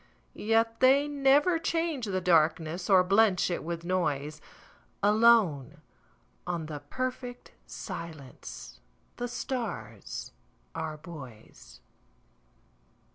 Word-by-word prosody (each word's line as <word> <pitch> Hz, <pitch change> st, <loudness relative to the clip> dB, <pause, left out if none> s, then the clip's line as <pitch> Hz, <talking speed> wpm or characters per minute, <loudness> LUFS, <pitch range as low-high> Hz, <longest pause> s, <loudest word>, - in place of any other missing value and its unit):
Yet 225 Hz, +1 st, +1 dB
they 270 Hz, +3 st, +5 dB
never 290 Hz, +4 st, +3 dB
change 325 Hz, -7 st, -1 dB
the 185 Hz, -2 st, -2 dB
darknessOr 175 Hz, +2 st, +3 dB
blench 195 Hz, -2 st, +4 dB
it 175 Hz, -, -2 dB
with 170 Hz, +1 st, -5 dB
noise; 155 Hz, -4 st, -1 dB, 0.6 s
Alone 210 Hz, -, +4 dB, 0.7 s
on 170 Hz, -2 st, -2 dB
the 150 Hz, -1 st, -6 dB
perfect 250 Hz, -, -5 dB, 0.2 s
silenceThe 155 Hz, -, -9 dB
stars 200 Hz, -, -5 dB, 0.4 s
are 155 Hz, -1 st, -4 dB
buoys. 125 Hz, -, -12 dB
185 Hz, 80 wpm, -29 LUFS, 155-245 Hz, 0.7 s, they